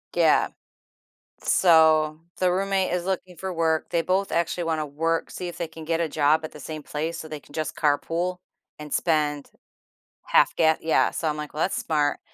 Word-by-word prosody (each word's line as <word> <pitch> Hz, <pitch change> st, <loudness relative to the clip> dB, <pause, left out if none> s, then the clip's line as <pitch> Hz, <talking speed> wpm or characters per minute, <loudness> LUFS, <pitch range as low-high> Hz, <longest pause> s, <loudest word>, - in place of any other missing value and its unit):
Yeah. -, -, +4 dB, 0.9 s
So, 155 Hz, -3 st, +4 dB, 0.2 s
the 185 Hz, -1 st, +2 dB
roommate 195 Hz, 0 st, 0 dB
is 180 Hz, 0 st, -1 dB
looking 185 Hz, -2 st, -3 dB
for 190 Hz, +2 st, -4 dB
work, 160 Hz, -1 st, 0 dB
they 170 Hz, -, +1 dB
both 190 Hz, +3 st, 0 dB
actually 170 Hz, +1 st, 0 dB
wanna 160 Hz, -2 st, -1 dB
work 165 Hz, +3 st, -1 dB
see 180 Hz, -, -5 dB
if 175 Hz, -, -7 dB
they 170 Hz, -2 st, -4 dB
can 160 Hz, -1 st, -10 dB
get 165 Hz, +1 st, 0 dB
a 165 Hz, -, -1 dB
job 155 Hz, +1 st, +2 dB
at 155 Hz, -, -6 dB
the 150 Hz, -, -12 dB
same 155 Hz, +1 st, -7 dB
place 160 Hz, +4 st, -3 dB
so 160 Hz, -, -7 dB
they 155 Hz, -, -6 dB
can 145 Hz, -, -20 dB
just 155 Hz, 0 st, -3 dB
carpool 170 Hz, +4 st, 0 dB, 0.4 s
and 150 Hz, -1 st, -7 dB
spend 150 Hz, -3 st, 0 dB, 0.7 s
half -, -, +3 dB
ga 160 Hz, -1 st, +3 dB
Yeah, 160 Hz, -, +2 dB
so 165 Hz, -, -2 dB
I'm 150 Hz, -1 st, -1 dB
like, 150 Hz, -1 st, -6 dB
"Well, 155 Hz, -, 0 dB
that's -, -, 0 dB
smart. 150 Hz, -2 st, 0 dB
160 Hz, 195 wpm, -25 LUFS, 155-175 Hz, 0.9 s, Yeah